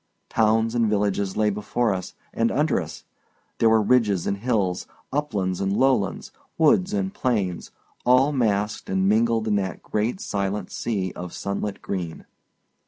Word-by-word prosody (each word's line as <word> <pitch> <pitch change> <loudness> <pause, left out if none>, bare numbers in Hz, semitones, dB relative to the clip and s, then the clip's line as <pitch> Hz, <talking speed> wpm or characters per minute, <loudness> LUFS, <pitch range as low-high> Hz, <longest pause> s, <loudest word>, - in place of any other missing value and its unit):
Towns 110 0 +2
and 115 -2 +2
villages 100 -2 0
lay 105 -1 +3
before 105 +2 0
us 95 -1 -6 0.2
and 115 0 +1
under 150 -7 +1
us; 75 -2 -9 0.6
there 115 - +5
were 110 -1 +4
ridges 105 -6 +2
and 100 - -1
hills, 100 -5 -1 0.3
uplands 105 -12 -1
and 95 +1 0
lowlands, 130 -8 +1 0.3
woods 180 +4 +4
and 200 -2 -1
plains, 105 - -1 0.3
all 130 +3 +4
massed 105 -5 0
and 95 0 +1
mingled 115 +1 +2
in 105 -1 +2
that 95 -2 -3
great 110 - -1
silent 100 - -2
sea 95 -6 -2
of 90 -1 -7
sunlit 100 0 -4
green. 90 -4 -4
105 Hz, 150 wpm, -24 LUFS, 95-120 Hz, 0.6 s, there